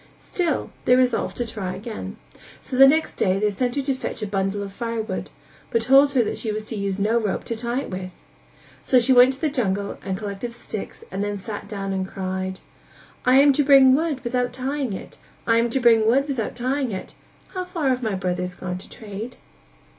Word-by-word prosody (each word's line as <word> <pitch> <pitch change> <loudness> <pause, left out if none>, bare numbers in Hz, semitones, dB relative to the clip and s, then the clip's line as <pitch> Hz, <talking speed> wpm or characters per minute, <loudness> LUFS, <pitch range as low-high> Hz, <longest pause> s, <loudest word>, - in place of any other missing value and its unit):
Still 340 -6 -1
they 250 - +6
resolved 255 -1 +1
to 240 - -1
try 200 -5 -4
again; 220 +1 -7 0.4
so 260 - -7
the 270 +1 +9
next 315 +3 +2
day 185 -1 +2
they 210 +1 +1
sent 245 +5 -1
her 280 - 0
to 270 0 0
fetch 255 -3 -5
a - - 0
bundle 195 0 -1
of 195 -1 -8
fire 230 0 -3
wood, 195 -4 -5 0.4
but 230 -1 +1
told 275 +3 +6
her 250 -3 +4
that - - -3
she 220 - -2
was 215 0 -4
to 225 - -5
use 200 -2 -2
no 215 +4 +2
rope 210 -4 -2
to 230 - -4
tie 240 +3 -2
it - - -8
with. 185 0 -4 0.7
So 255 - +4
she 255 +2 +4
went 250 +1 +7
to 265 - -14
the 310 -3 +1
jungle 200 -7 -1
and 190 -1 -2
collected 210 +3 -5
the - - -19
sticks - - -7
and 200 - -2
then 205 0 -2
sat 205 +1 -7
down 195 -2 -4
and 190 -1 -2
cried: 190 0 -4 0.7
"I 255 - +6
am 280 +1 +7
to 290 - +2
bring 270 -2 +7
wood 295 -2 0
without 245 0 -1
tying 260 -2 -2
it, - - -9 0.3
I 230 -1 +3
am 235 +1 +2
to 265 - 0
bring 230 -3 +5
wood 270 +5 +3
without 260 -6 -2
tying 255 +1 -1
it, 190 - -6 0.4
How 370 -1 -4
far 335 -6 -1
have 255 -1 +1
my 220 -4 -1
brothers 180 -1 -2
gone 180 0 -5
to - - -12
trade?" 220 +3 -7
230 Hz, 220 wpm, -23 LUFS, 200-260 Hz, 0.7 s, the